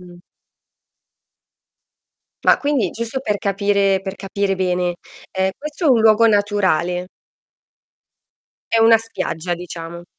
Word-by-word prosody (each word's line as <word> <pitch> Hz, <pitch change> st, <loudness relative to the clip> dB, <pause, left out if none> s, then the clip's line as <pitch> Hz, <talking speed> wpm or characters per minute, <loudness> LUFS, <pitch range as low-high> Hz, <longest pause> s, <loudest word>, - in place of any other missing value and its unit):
Mh. 175 Hz, -1 st, -14 dB, 2.2 s
Ma -, -, +4 dB
quindi, 280 Hz, -10 st, 0 dB
giusto 235 Hz, +3 st, -4 dB
per 210 Hz, -6 st, -2 dB
capire 200 Hz, -1 st, +1 dB
per 195 Hz, 0 st, -6 dB
capire 195 Hz, 0 st, -2 dB
bene, 180 Hz, -1 st, -1 dB, 0.3 s
ehm, 190 Hz, 0 st, 0 dB
questo 300 Hz, +3 st, -4 dB
è -, -, +5 dB
un 245 Hz, -4 st, +4 dB
luogo 220 Hz, +1 st, +5 dB
naturale? 190 Hz, -4 st, +1 dB, 1.6 s
È 225 Hz, -, +3 dB
una 225 Hz, 0 st, +7 dB
spiaggia 175 Hz, -6 st, -4 dB
diciamo. 170 Hz, 0 st, -8 dB
195 Hz, 110 wpm, -19 LUFS, 180-225 Hz, 2.2 s, una